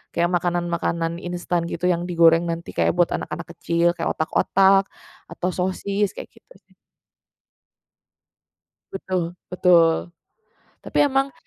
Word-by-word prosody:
Kayak 170 +1 +1
makanan-makanan 170 -1 -2
instan 175 -1 -2
gitu, 170 - -6
yang 175 0 -2
digoreng 170 -1 +4
nanti 170 0 -4
kayak - - 0
buat 175 -1 +2
anak-anak 160 +2 -5
kecil, 170 0 +1
kayak 165 - -2
otak-otak 195 +4 +3 0.4
atau 180 - -3
sosis 195 +2 -2
kayak - - -9
gitu - - -21
sih. - - -30 2.2
Betul, 185 -3 -3 0.2
betul, 175 -2 +3 0.7
tapi - - -3
emang 270 0 0
175 Hz, 115 wpm, -22 LUFS, 170-185 Hz, 2.2 s, digoreng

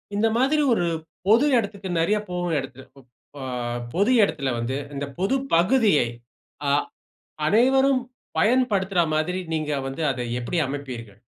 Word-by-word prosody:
இந்த 220 +2 +3
மாதிரி 285 +4 +3
ஒரு 175 - +1 0.4
பொது 230 +7 +5
இடத்துக்கு 200 -3 -3
நெறைய 205 +6 +2
போகும் 175 -2 -1
இடத்துல 135 -1 -8
ப் 130 - -17 0.3
ஆ, - - -7 0.5
பொது 200 +7 +2
இடத்துல 155 -8 0
வந்து, 120 +3 -2 0.2
இந்த 140 +1 -3
பொது 195 +8 +1 0.2
பகுதியை 190 - +4 0.6
அ - - +3 0.8
அனைவரும் 265 - +4 0.4
பயன்படுத்துறா 200 -7 +2
மாதிரி 175 +4 0
நீங்க 155 -2 -1 0.2
வந்து, 135 +5 -5
அதை 125 -1 -4 0.2
எப்படி 165 +8 -2
அமைப்பீர்கள்? 125 -7 -7
180 Hz, 130 wpm, -24 LUFS, 140-220 Hz, 0.8 s, பொது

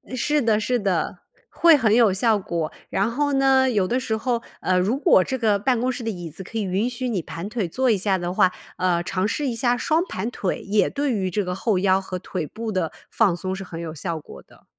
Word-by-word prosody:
是 295 +4 +1
的 220 -3 +2
是 245 +2 0
的， 195 -4 -1 0.3
会 335 -2 +5
很 230 -7 +3
有 230 -4 +5
效 215 +2 +2
果。 170 -4 -3 0.2
然 200 +4 +1
后 285 +3 0
呢， 270 -1 +4
有 205 -6 +1
的 250 - 0
时 225 -4 -2
候 235 +1 -1 0.2
呃， 185 0 +2
如 210 +8 +1
果 280 - +5
这 260 - -3
个 215 -4 +2
办 245 +2 +1
公 255 +2 0
室 245 -1 -6
的 225 - -2
椅 175 -5 -5
子， 180 +5 -9
可 225 +5 -7
以 215 - 0
允 195 +5 0
许 250 0 -3
你 195 -7 -1
盘 170 +5 -7
腿 215 -5 -2
坐 255 +8 +1
一 215 - +3
下 190 0 +1
的 175 0 -3
话， 185 -1 +4 0.3
呃， 175 -2 +1
尝 185 +2 -1
试 285 +6 -1
一 240 - -2
下 240 +1 +2
双 315 +6 +1
盘 210 +6 -3
腿， 190 - -2
也 205 +1 +1
对 285 -1 -1
于 195 -5 -1
这 200 +3 -1
个 180 0 -3
后 195 0 0
腰 190 0 +3
和 190 -1 -5
腿 175 -3 -4
部 225 +4 -5
的 185 -4 -1 0.2
放 205 -7 +3
松， 185 +2 -4
是 195 - -6
很 170 -2 -7
有 160 -2 -5
效 165 +1 -4
果 145 - -12
的。 - - -23
210 Hz, 270 characters per minute, -23 LUFS, 185-245 Hz, 0.3 s, 会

